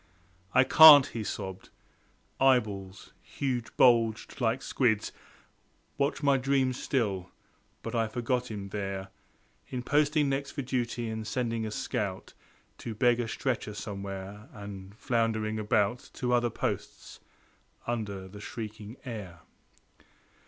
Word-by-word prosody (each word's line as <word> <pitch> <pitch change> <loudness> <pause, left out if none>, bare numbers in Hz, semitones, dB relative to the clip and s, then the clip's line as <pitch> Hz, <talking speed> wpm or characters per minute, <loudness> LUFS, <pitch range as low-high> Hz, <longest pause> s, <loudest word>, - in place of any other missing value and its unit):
"I 130 - +7
can't," 145 0 +10
he 115 -5 -5
sobbed. 95 -3 -6 0.7
Eyeballs, 105 -8 +1
huge 125 -4 -4
bulged 115 0 +3
like 120 +2 +1
squids 110 -5 +1 0.8
Watch 140 +2 -1
my 140 -1 +4
dreams 130 -1 +1
still; 100 -9 -1 0.5
but - - -5
I 115 -2 +1
forgot 125 +2 -2
him 100 -3 -6
there 95 -1 -4 0.6
In 125 -1 -4
posting 150 +1 +2
next 140 0 -2
for 140 - -3
duty, 120 -2 -2
and 110 -1 -4
sending 115 -2 -1
a - - -3
scout 100 -2 -3 0.5
To 115 - -6
beg 120 +2 +3
a 120 - -1
stretcher 110 -3 -2
somewhere, 100 0 -7
and 100 -1 -9
floundering 110 -2 0
about 105 +2 0
To 125 -1 -1
other 120 0 +3
posts - - -5 0.7
under 100 -5 -3
the 100 +2 -11
shrieking 110 +1 -7
air. 100 -9 -7
115 Hz, 125 wpm, -29 LUFS, 105-125 Hz, 0.8 s, can't